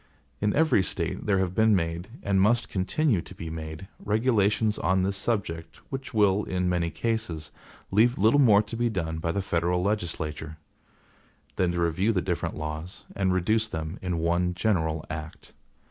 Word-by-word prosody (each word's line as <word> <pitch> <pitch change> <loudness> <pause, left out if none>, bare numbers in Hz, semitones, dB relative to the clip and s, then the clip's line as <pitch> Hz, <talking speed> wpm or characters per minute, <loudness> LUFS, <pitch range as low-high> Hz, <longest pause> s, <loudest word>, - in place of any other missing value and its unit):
In 105 0 +1
every 155 -9 +4
State 95 - -3
there 100 -2 +3
have 95 -2 0
been 110 +1 +4
made, 85 0 -2 0.2
and 100 -1 +2
must 115 +4 +3
continue 105 - +1
to 95 - -12
be 80 -2 -6
made, 80 +3 -7 0.2
regulations 105 -1 +2
on 95 +1 +2
this 100 +1 0
subject 95 -7 -2 0.2
which 135 0 -5
will, 105 -2 +3
in 90 -1 -1
many 90 -2 +1
cases, 90 -9 -3 0.4
leave 115 +5 +4
little 110 +8 +4
more 110 -6 +6
to 105 +2 -6
be 120 +1 +1
done 80 -6 -3
by 85 0 -1
the 100 +2 -2
federal 90 -1 0
legislature, 80 -6 -3 1.0
than 90 -2 +1
to 85 - -2
review 85 +6 +1
the 95 - +2
different - - -2
laws, 80 +4 -6
and 95 -2 +1
reduce 110 +5 +1
them 80 +2 -5
in 90 -2 -2
one 85 +2 +1
general 80 -6 0
act. 80 0 -8
95 Hz, 170 wpm, -27 LUFS, 85-105 Hz, 1.0 s, more